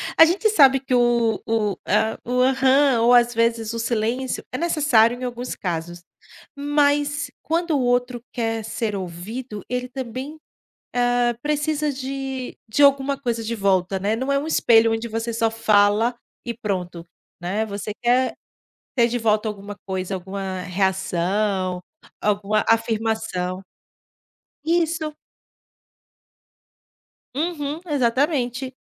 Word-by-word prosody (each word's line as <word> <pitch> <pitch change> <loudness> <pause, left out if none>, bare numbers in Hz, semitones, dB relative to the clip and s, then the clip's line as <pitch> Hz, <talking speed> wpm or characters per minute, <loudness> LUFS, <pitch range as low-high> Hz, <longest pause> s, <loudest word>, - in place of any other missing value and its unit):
a 325 - +9
gente 360 +6 +1
sabe 275 -10 +6
que 265 -1 -4
o 240 -2 +2
o 215 -3 0
a 220 +2 +1
o 250 +1 -1
aham, 265 -1 +4
ou, 240 +1 +4
às 240 0 +4
vezes, 230 -1 0
o 230 - -3
silêncio 235 +3 -1
é 255 - -4
necessário 265 -9 +3
em 255 - -7
alguns 245 0 -4
casos, 175 -1 -4 0.5
mas 290 0 +1
quando 335 +1 -1
o 275 - +1
outro 245 -1 0
quer 225 -2 -2
ser 215 -1 -3
ouvido, 200 +5 -6
ele 250 +1 -3
também, 260 +4 -6 0.6
hã, 245 -1 +2
precisa 300 +1 0
de 265 -1 -5
de 255 +7 +1
alguma 280 0 +4
coisa 235 -4 -2
de 230 +1 -3
volta, 195 -2 +1
né, 205 +3 0
não 260 +4 -2
é 275 - +3
um 290 - -4
espelho 225 -7 +4
onde 225 +1 -2
você 225 +1 -3
só 225 0 +1
fala 220 +1 +3 0.3
e 235 - -3
pronto, 185 -6 -4 0.4
né, 195 +5 -1
você 205 0 -5
quer 250 +2 +2 0.6
ter 235 -2 +4
de 245 - -2
volta 215 -1 +1
alguma 205 0 -7
coisa, 190 0 -3
alguma 190 0 -5
reação, 190 0 -1 0.4
alguma 210 +1 +1
afirmação. 220 -5 0 1.0
Isso. 325 -2 0 2.2
Uhum, 305 -1 -2
exatamente, 260 -2 0
235 Hz, 130 wpm, -22 LUFS, 210-265 Hz, 2.2 s, a